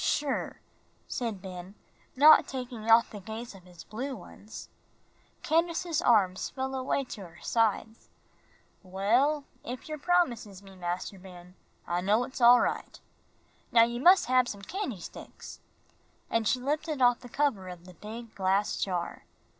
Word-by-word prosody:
"Sure," 290 Hz, -2 st, -1 dB, 0.5 s
said 225 Hz, -6 st, -4 dB
Ben, 185 Hz, +1 st, -8 dB, 0.4 s
not 300 Hz, +4 st, +7 dB
taking 245 Hz, -4 st, -6 dB
off 225 Hz, +1 st, +6 dB
the 210 Hz, -, -7 dB
gaze 220 Hz, +4 st, -7 dB
of 190 Hz, -2 st, -15 dB
his 180 Hz, -2 st, -13 dB
blue 260 Hz, +5 st, -5 dB
ones. 210 Hz, +1 st, -11 dB, 0.8 s
Candace's 335 Hz, 0 st, +1 dB
arms 190 Hz, -6 st, +3 dB
fell 265 Hz, 0 st, -4 dB
away 265 Hz, +1 st, -1 dB
to 230 Hz, -5 st, -9 dB
her 170 Hz, 0 st, -17 dB
sides. 225 Hz, 0 st, -1 dB, 0.7 s
"Well, 230 Hz, +11 st, +1 dB, 0.2 s
if 250 Hz, +1 st, -7 dB
yer 305 Hz, -1 st, -5 dB
promises 240 Hz, -, 0 dB
me, 195 Hz, -1 st, -14 dB
Mas'r 180 Hz, +2 st, -4 dB
Ben, 180 Hz, -1 st, -13 dB, 0.3 s
I 175 Hz, +1 st, -1 dB
know 210 Hz, +6 st, +2 dB
it's 260 Hz, +1 st, -7 dB
all 240 Hz, +1 st, +8 dB
right. -, -, -3 dB, 0.7 s
Now 230 Hz, -1 st, +7 dB
you 235 Hz, +1 st, -1 dB
mus' 360 Hz, +7 st, +6 dB
hab 255 Hz, -1 st, +3 dB
some 200 Hz, -3 st, -7 dB
candy 350 Hz, -, -4 dB
sticks," -, -, -10 dB, 0.7 s
and 230 Hz, -2 st, +1 dB
she 255 Hz, -, +2 dB
lifted 300 Hz, +3 st, -2 dB
off 245 Hz, -1 st, +4 dB
the 245 Hz, -, -12 dB
cover 245 Hz, -9 st, 0 dB
of 175 Hz, -1 st, -10 dB
the 180 Hz, -, -12 dB
big 220 Hz, +5 st, -9 dB
glass 195 Hz, +2 st, 0 dB
jar. 180 Hz, -3 st, -3 dB
230 Hz, 150 wpm, -29 LUFS, 195-265 Hz, 0.8 s, all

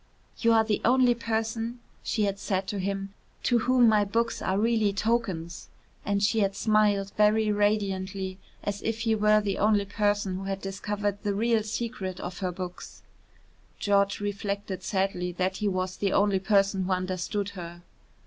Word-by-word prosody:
"You 230 Hz, -, +3 dB
are 225 Hz, 0 st, +5 dB
the 215 Hz, -2 st, -1 dB
only 250 Hz, 0 st, +5 dB
person," 225 Hz, +1 st, -2 dB, 0.2 s
she 215 Hz, -, -1 dB
had 200 Hz, -1 st, -1 dB
said 190 Hz, -1 st, -1 dB
to 205 Hz, -2 st, -3 dB
him, 195 Hz, +1 st, -3 dB, 0.3 s
"to 240 Hz, -1 st, +3 dB
whom 250 Hz, +1 st, +4 dB
my 215 Hz, -2 st, +4 dB
books 230 Hz, +3 st, -1 dB
are 190 Hz, -, 0 dB
really 220 Hz, -1 st, +2 dB
tokens," 195 Hz, -6 st, -2 dB, 0.3 s
and 200 Hz, 0 st, 0 dB
she 205 Hz, +2 st, +2 dB
had 195 Hz, -1 st, +1 dB
smiled 210 Hz, -2 st, +2 dB
very 215 Hz, 0 st, +4 dB
radiantly 195 Hz, -2 st, -1 dB, 0.2 s
as 205 Hz, 0 st, -3 dB
if 225 Hz, 0 st, -2 dB
he 225 Hz, -1 st, +2 dB
were 215 Hz, 0 st, +4 dB
the 200 Hz, -1 st, -2 dB
only 205 Hz, -1 st, +3 dB
person 205 Hz, -2 st, 0 dB
who 195 Hz, -, -6 dB
had 195 Hz, 0 st, -3 dB
discovered 205 Hz, +1 st, -3 dB
the 205 Hz, -2 st, -1 dB
real 225 Hz, +1 st, +2 dB
secret 210 Hz, -3 st, -4 dB
of 175 Hz, -1 st, -6 dB
her 185 Hz, -2 st, -1 dB
books. 180 Hz, 0 st, -8 dB, 0.7 s
George 200 Hz, -1 st, +2 dB
reflected 200 Hz, -1 st, -3 dB
sadly 190 Hz, -3 st, -1 dB
that 185 Hz, +1 st, -1 dB
he 210 Hz, -, -1 dB
was 185 Hz, -1 st, -1 dB
the 195 Hz, -2 st, 0 dB
only 200 Hz, -1 st, +3 dB
person 195 Hz, -1 st, +2 dB
who 190 Hz, -, -2 dB
understood 185 Hz, +2 st, -2 dB
her. 175 Hz, -2 st, -9 dB
205 Hz, 170 wpm, -27 LUFS, 190-215 Hz, 0.7 s, are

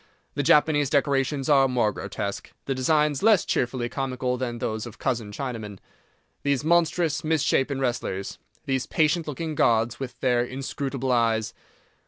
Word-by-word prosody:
The 145 Hz, -, -1 dB
Japanese 145 Hz, 0 st, +3 dB
decorations 140 Hz, -1 st, +1 dB
are 135 Hz, -2 st, +5 dB
more 120 Hz, -4 st, +1 dB
grotesque, -, -, -5 dB
the 135 Hz, -, -1 dB
designs 150 Hz, +2 st, +1 dB
less 215 Hz, -3 st, +4 dB
cheerfully 125 Hz, -1 st, -1 dB
comical 130 Hz, -1 st, -2 dB
than 120 Hz, -2 st, -3 dB
those 110 Hz, 0 st, -3 dB
of 115 Hz, -, -11 dB
cousin 115 Hz, -5 st, -2 dB
Chinaman. 110 Hz, -4 st, -5 dB, 0.6 s
These 140 Hz, -1 st, 0 dB
monstrous, 165 Hz, -1 st, +2 dB
mis 155 Hz, -2 st, +1 dB
shapen 135 Hz, -1 st, +1 dB
wrestlers, 120 Hz, -7 st, -3 dB, 0.3 s
these 130 Hz, -1 st, -1 dB
patient 160 Hz, +1 st, +1 dB
looking 155 Hz, +2 st, -4 dB
gods, 120 Hz, -3 st, +2 dB
with 135 Hz, -2 st, -6 dB
their 125 Hz, -2 st, +2 dB
inscrutable 135 Hz, +1 st, -3 dB
eyes! 115 Hz, -2 st, +1 dB
135 Hz, 145 wpm, -25 LUFS, 120-145 Hz, 0.6 s, are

